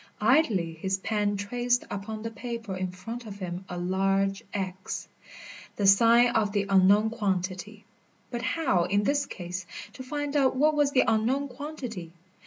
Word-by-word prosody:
Idly 215 - +3
his 190 +4 -2
pen 205 0 -1
traced 245 +4 0
upon 215 +2 -5
the 225 - -4
paper 230 -2 -5
in 185 0 -2
front 225 +6 -7
of 200 -1 -8
him 180 -1 -5
a 180 - -5
large 195 +2 0
X, 190 -1 -4 0.7
the 205 - -1
sign 230 +5 +6
of 215 -4 +1
the 200 -1 +1
unknown 200 +3 +5
quantity. 200 -1 -3 0.5
But 240 -1 -3
how, 255 - +1
in 205 +2 +1
this 280 +3 +1
case, 180 -1 -6 0.3
to - - -9
find 290 +2 -4
out 270 -3 +3
what 300 +4 +3
was 290 -2 +3
the 270 -2 +4
unknown 250 +6 +1
quantity? 245 - -7
210 Hz, 160 wpm, -27 LUFS, 190-245 Hz, 0.7 s, sign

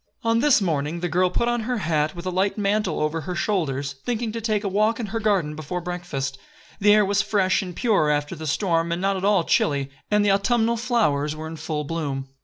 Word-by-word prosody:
On 230 0 +2
this 275 -3 +4
morning 160 -1 -1
the 175 - 0
girl 180 +2 +2
put 235 +6 0
on 240 0 +1
her 245 +2 -2
hat, 155 -4 0
with 170 +1 -8
a 185 - -1
light 190 +3 0
mantle 205 -3 0
over 155 +2 -1
her 180 +3 -5
shoulders, 145 -8 -1
thinking 235 -2 -2
to 230 +1 -5
take 215 -1 0
a - - -1
walk 215 +4 +1
in 235 - -2
her 225 - 0
garden 195 -8 +1
before 155 +4 -4
breakfast. 170 -7 -4 0.4
The 205 0 +5
air 210 0 +5
was 200 0 +2
fresh 195 -2 +1
and 180 -3 -7
pure 210 -11 +2
after 145 0 0
the 155 0 -6
storm 165 +1 0
and 170 - -1
not 195 +1 +1
at 190 - -4
all 200 -3 +3
chilly, 140 -3 +1 0.2
and 210 0 +3
the 200 - +4
autumnal 230 +3 +2
flowers 205 - +1
were 155 +1 -7
in 160 +1 -6
full 155 -1 -3
bloom. 140 -4 -4
185 Hz, 230 wpm, -23 LUFS, 155-210 Hz, 0.4 s, The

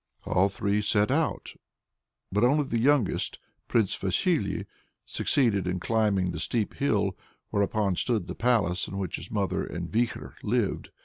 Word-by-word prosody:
All 95 +2 +3
three 100 +1 0
set 105 +2 +3
out, 155 +2 -1 0.8
but 105 +4 +1
only 145 +5 +4
the 120 -4 -1
youngest, 135 -3 +2 0.3
Prince 110 -5 +2
Vasily, 100 - 0 0.4
succeeded 110 -9 +1
in 90 0 -1
climbing 100 -3 +1
the 80 - -5
steep 110 +4 -1
hill, 100 -8 +1 0.4
whereon 100 -1 +1
stood 110 -1 0
the - - -5
palace 105 -8 +1
in 95 - -6
which 95 -4 -3
his - - -7
mother 95 -3 -1
and 85 -1 -5
Vikhor 115 +2 -1
lived. 110 -1 -1
105 Hz, 145 wpm, -27 LUFS, 95-120 Hz, 0.8 s, only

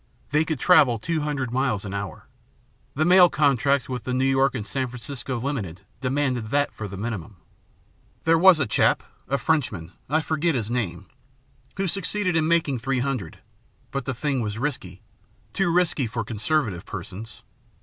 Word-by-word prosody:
They 150 +2 +3
could 160 -4 -2
travel 145 -9 +5
two 160 +7 -2
hundred 145 -5 -2
miles 125 -5 0
an 100 - -5
hour. 100 -1 -5 0.7
The 155 +3 +2
mail 180 0 +7
contracts 140 -3 +2
with 125 -3 -4
the 125 +1 -2
New 130 +1 +2
York 135 0 +3
and 105 - -3
San 130 +2 -2
Francisco 125 0 -5
Limited 110 - -3 0.2
demanded 130 -4 -1
that 145 +3 +1
for 105 - -6
the 100 0 -8
minimum. 105 -3 -5 0.9
There 165 0 +4
was 185 -2 +7
a 140 - +2
chap, 105 - +2 0.2
a 140 - +1
Frenchman, 120 - -1 0.2
I 155 +3 +2
forget 160 0 0
his 115 -2 -2
name, 95 -7 -2 0.7
who 195 - 0
succeeded 190 0 -1
in 160 -1 +2
making 160 -6 +2
three 135 +3 -1
hundred; 125 -11 -3 0.5
but 135 -1 -3
the 130 - -2
thing 135 0 -1
was 105 -1 -3
risky, 140 +2 -4 0.5
too 195 -3 +1
risky 170 -7 +2
for 115 0 -3
conservative 110 - -1
persons. 105 +2 -8
130 Hz, 170 wpm, -24 LUFS, 110-155 Hz, 0.9 s, mail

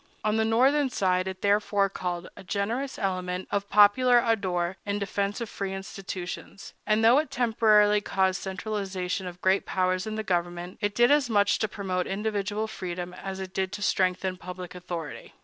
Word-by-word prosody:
On 215 0 +1
the 220 - +3
Northern 265 +6 +3
side 185 -5 +1
it 190 0 -6
therefore 205 0 +2
called 180 -2 -4
forth - - -13
a - - -11
generous 225 +8 -2
element 185 -2 -2
of 200 0 -1
popular 240 +5 +6
ardor 190 -6 0
in 200 0 -2
defense 200 0 -2
of 235 - -3
free 195 -2 -4
institutions; 195 0 -7
and 215 +1 +3
though 245 +5 +7
it 310 - -2
temporarily 215 -3 +4
caused 190 -2 0
centralization 190 -2 -3
of 180 0 -9
great 190 +1 +2
powers 185 +1 0
in 215 - -3
the 220 - -3
government, 175 -1 -2
it 205 0 -1
did 240 +3 +5
as 290 -4 +3
much 205 -2 +3
to 220 - +1
promote 190 -3 -3
individual 210 +1 -2
freedom 180 -4 -5
as 190 +1 -6
it 190 -1 -6
did 190 -1 -1
to 205 0 -4
strengthen 185 -1 +1
public 180 0 -8
authority. 175 -4 -7
195 Hz, 180 wpm, -27 LUFS, 185-215 Hz, -, though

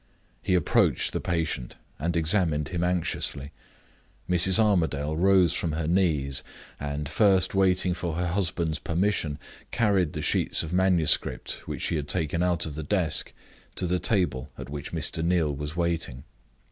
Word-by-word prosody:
He 95 - +1
approached 85 - +2
the - - -2
patient, 80 -7 -2 0.2
and 85 +3 -1
examined 80 -3 +1
him 85 -1 -2
anxiously. 85 -5 -1 0.8
Mrs. 90 +2 +4
Armadale 80 -9 +1
rose 95 -1 +4
from 80 -3 -2
her 80 0 -2
knees; 75 -6 +1 0.4
and, 75 0 -4
first 95 0 +3
waiting 95 -2 +2
for 85 -2 -4
her 90 +1 -1
husband's 85 -4 -1
permission, 85 -4 -1 0.3
carried 100 -9 +1
the 75 - -4
sheets - - +2
of 80 +1 -6
manuscript 90 -4 +1
which - - -4
she 80 - 0
had 75 -1 -4
taken 80 +1 -1
out 90 -2 +1
of 80 - -6
the 80 - -5
desk 80 -1 0 0.4
to 95 - -1
the 90 +1 0
table 90 - 0
at - - -8
which 75 -2 -6
Mr. 80 - -1
Neal 85 -4 +1
was 75 +2 -6
waiting. 85 -7 -2
85 Hz, 155 wpm, -26 LUFS, 75-90 Hz, 0.8 s, Mrs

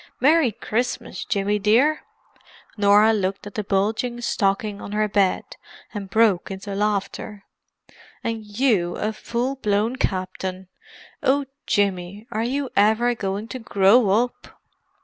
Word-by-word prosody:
"Merry 295 -2 +4
Christmas, 225 +3 -3
Jimmy 205 +1 0
dear." 240 +10 +3 0.8
Norah 210 +1 +5
looked 195 -2 -2
at 205 - -8
the 210 - -3
bulging 220 +5 0
stocking 200 -2 -1
on 205 - -7
her 215 0 +1
bed, 200 -2 +2 0.5
and 200 -3 -6
broke 210 -3 +3
into 195 +1 -6
laughter. 205 0 -2 0.8
"And 225 -1 -3
you 210 -5 +1
a 215 +1 -2
full 245 +5 -3
blown 215 +1 0
Captain! 185 -2 -3 0.5
Oh, 280 +1 +2 0.2
Jimmy, 200 0 0
are 215 - -1
you 270 +3 -2
ever 220 +4 +3
going 200 -1 -3
to 255 - -5
grow 205 0 +4
up?" 235 +5 0
210 Hz, 130 wpm, -23 LUFS, 195-235 Hz, 0.8 s, Norah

